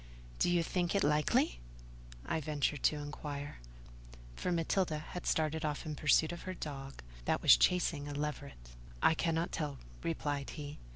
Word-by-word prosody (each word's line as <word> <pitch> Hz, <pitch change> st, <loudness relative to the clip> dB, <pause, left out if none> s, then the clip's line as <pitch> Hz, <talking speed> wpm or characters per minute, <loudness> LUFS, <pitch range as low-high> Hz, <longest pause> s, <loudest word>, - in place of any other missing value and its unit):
"Do -, -, +3 dB
you 175 Hz, -1 st, +3 dB
think 175 Hz, +2 st, 0 dB
it 200 Hz, -, +3 dB
likely?" 150 Hz, -, +2 dB, 0.7 s
I 160 Hz, -, -1 dB
ventured 150 Hz, -1 st, -1 dB
to -, -, +4 dB
inquire: 145 Hz, -, -6 dB, 0.8 s
for 180 Hz, -, -2 dB
Matilda 170 Hz, -1 st, +1 dB
had 165 Hz, +3 st, -6 dB
started 160 Hz, 0 st, +1 dB
off 150 Hz, +1 st, -2 dB
in 155 Hz, -, -3 dB
pursuit 155 Hz, +2 st, +4 dB
of 175 Hz, -, -6 dB
her 185 Hz, 0 st, -5 dB
dog, 135 Hz, -, -6 dB, 0.2 s
that -, -, +1 dB
was -, -, +10 dB
chasing 165 Hz, -5 st, +2 dB
a 145 Hz, -, -4 dB
leveret. 140 Hz, -, -5 dB, 0.3 s
"I -, -, +6 dB
cannot 165 Hz, +1 st, 0 dB
tell," 145 Hz, -3 st, -3 dB, 0.2 s
replied 145 Hz, -4 st, -2 dB
he. 145 Hz, -1 st, -6 dB
150 Hz, 160 wpm, -34 LUFS, 145-165 Hz, 0.8 s, was